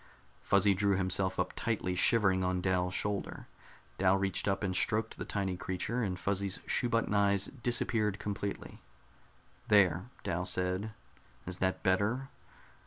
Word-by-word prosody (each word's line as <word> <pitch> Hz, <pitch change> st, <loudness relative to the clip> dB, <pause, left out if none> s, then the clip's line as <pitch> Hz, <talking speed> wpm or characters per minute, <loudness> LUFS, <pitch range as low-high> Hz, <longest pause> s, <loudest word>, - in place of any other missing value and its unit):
Fuzzy 100 Hz, 0 st, +4 dB
drew 100 Hz, +1 st, +1 dB
himself 95 Hz, 0 st, +1 dB
up -, -, -1 dB
tightly, 110 Hz, -5 st, -1 dB
shivering 95 Hz, 0 st, +3 dB
on 90 Hz, 0 st, 0 dB
Dal's 90 Hz, 0 st, 0 dB
shoulder. 105 Hz, -1 st, -3 dB, 0.5 s
Dal 95 Hz, 0 st, +4 dB
reached 95 Hz, 0 st, -1 dB
up 95 Hz, +1 st, 0 dB
and 95 Hz, -2 st, -1 dB
stroked 110 Hz, +3 st, 0 dB
the -, -, -4 dB
tiny 95 Hz, -2 st, -2 dB
creature, 95 Hz, +7 st, -3 dB
and 95 Hz, -5 st, -2 dB
Fuzzy's 100 Hz, 0 st, -2 dB
shoe 120 Hz, -, 0 dB
button 115 Hz, -2 st, 0 dB
eyes 100 Hz, -1 st, +2 dB
disappeared 110 Hz, -4 st, +1 dB
completely. 100 Hz, -1 st, -5 dB, 0.9 s
"There," 95 Hz, 0 st, +3 dB
Dal 90 Hz, +2 st, -2 dB
said. 90 Hz, +4 st, -1 dB, 0.5 s
"Is 90 Hz, +1 st, -5 dB
that 95 Hz, 0 st, -1 dB
better?" 110 Hz, +8 st, +1 dB
95 Hz, 140 wpm, -32 LUFS, 95-105 Hz, 0.9 s, Fuzzy